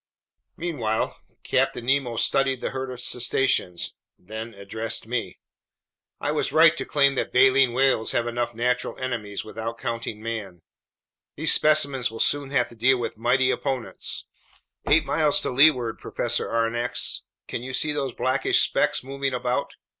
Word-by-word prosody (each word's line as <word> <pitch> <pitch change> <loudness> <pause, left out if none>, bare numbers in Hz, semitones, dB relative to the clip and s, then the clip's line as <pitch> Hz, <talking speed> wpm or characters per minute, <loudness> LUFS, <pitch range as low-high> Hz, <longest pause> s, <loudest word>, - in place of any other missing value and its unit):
Meanwhile 125 -11 -2 0.3
Captain 120 - 0
Nemo 130 -3 +1
studied 135 +1 +1
the - - -3
herd 130 0 -4
of 125 -1 -7
cetaceans, 125 -8 0 0.2
then 110 +3 -8
addressed 110 +4 -4
me: 120 +1 -3 0.8
"I - - -1
was - - -1
right 165 +1 +6
to - - -3
claim 140 -2 +3
that 135 - -2
baleen 130 0 +5
whales 130 -2 +2
have 120 - 0
enough 120 0 -2
natural 125 +2 -1
enemies 115 -6 -4
without 110 +1 -5
counting 115 -3 -4
man. 105 -6 -6 0.7
These 155 +2 +4
specimens 140 -5 +3
will 115 0 -9
soon 145 -1 +1
have 130 -3 +1
to 120 - -13
deal 130 +3 +3
with 120 -1 -4
mighty 130 +3 +3
opponents. 135 -4 -3 0.6
Eight 160 +2 +5
miles 150 -2 +2
to - - -2
leeward, 125 -4 +4
Professor 120 0 -2
Aronnax, 120 +1 -1 0.3
can - - -4
you 130 +1 -6
see 150 +4 0
those 140 -3 -2
blackish 130 +3 +2
specks - - +1
moving 135 0 -3
about?" 125 0 -2
125 Hz, 150 wpm, -24 LUFS, 115-135 Hz, 0.8 s, right